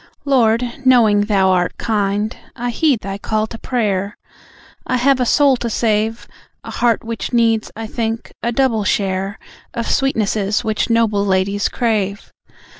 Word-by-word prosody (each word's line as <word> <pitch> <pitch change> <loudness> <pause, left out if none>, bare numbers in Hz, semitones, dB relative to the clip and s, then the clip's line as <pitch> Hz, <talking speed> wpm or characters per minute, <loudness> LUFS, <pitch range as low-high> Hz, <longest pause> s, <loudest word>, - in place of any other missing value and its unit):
Lord, 240 -4 +3 0.2
knowing 230 -6 +5
Thou 195 -3 +3
art 180 -1 0
kind, 210 0 -1 0.2
I 245 -1 -3
heed 270 -2 +1
Thy 195 0 -5
call 215 +1 -1
to 225 +1 -9
prayer. 205 -5 -1 0.7
I 255 - +1
have 265 +2 +3
a 250 - +1
soul 280 -1 +4
to 235 - -3
save; 220 0 0 0.4
A - - -8
heart 235 -2 +1
which 230 +2 -5
needs, 225 -2 +2
I 225 +1 -5
think, 225 0 -4
a 235 - -1
double 235 -3 +1
share 195 0 -1 0.4
Of 235 -1 -3
sweetnesses 215 -6 0
which 215 +1 -1
noble 225 -3 +2
ladies 200 +1 0
crave. 210 -4 -2
220 Hz, 150 wpm, -18 LUFS, 205-235 Hz, 0.7 s, knowing